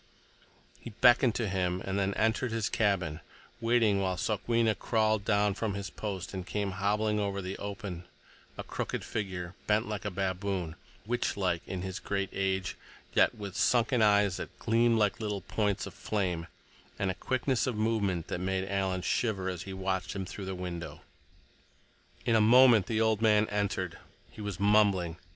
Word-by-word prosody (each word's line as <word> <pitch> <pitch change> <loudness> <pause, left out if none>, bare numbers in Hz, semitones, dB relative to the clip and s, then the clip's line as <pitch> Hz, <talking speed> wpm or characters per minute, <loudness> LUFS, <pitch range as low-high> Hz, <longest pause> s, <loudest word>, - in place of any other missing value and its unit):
He - - -8
beckoned 120 +1 +4
to 115 - 0
him 90 -2 0
and 95 +1 -1
then 100 0 0
entered 115 +2 +1
his 110 -2 -1
cabin, 90 -7 0 0.4
waiting 115 -4 +3
while 95 -1 -1
Sokwenna 115 +3 +1
crawled 110 -2 +1
down 105 -1 +2
from 105 0 -2
his 100 -1 -5
post 100 -4 -5
and 95 -1 -4
came 100 +1 -2
hobbling 105 +3 0
over 100 -1 -1
the 95 0 -4
open, 100 -3 -6 0.5
a - - -4
crooked - - -4
figure, 90 -5 -4
bent 105 +2 +2
like 105 -1 -4
a 105 - -1
baboon, 95 -3 -2 0.3
witch 120 0 -1
like 90 -4 0
in 90 -1 -4
his 95 -1 -4
great 100 -1 -2
age, 95 -1 -1 0.4
yet - - +4
with 100 -2 -7
sunken 120 +1 +3
eyes 100 -3 +4
that - - -7
gleamed 115 0 +3
like 105 -1 +1
little 105 -3 -3
points 105 +2 -1
of - - -8
flame, 90 -6 -2 0.5
and 95 -2 0
a - - -3
quickness 130 +6 0
of 125 - -1
movement 105 -6 0
that - - -3
made 95 +1 -1
Alan 95 -2 -1
shiver 100 -5 0
as 90 -2 -4
he 95 - -7
watched 95 0 -2
him 95 -1 -3
through 95 +2 -7
the 95 0 -4
window. 90 -2 -6 1.2
In 115 - +3
a 110 - +5
moment 120 -2 +7
the 110 -1 0
old 110 -1 +2
man 105 -1 +4
entered. 100 -4 -2 0.3
He - - -10
was 100 -3 -4
mumbling. 100 -5 +3
100 Hz, 175 wpm, -30 LUFS, 95-110 Hz, 1.2 s, moment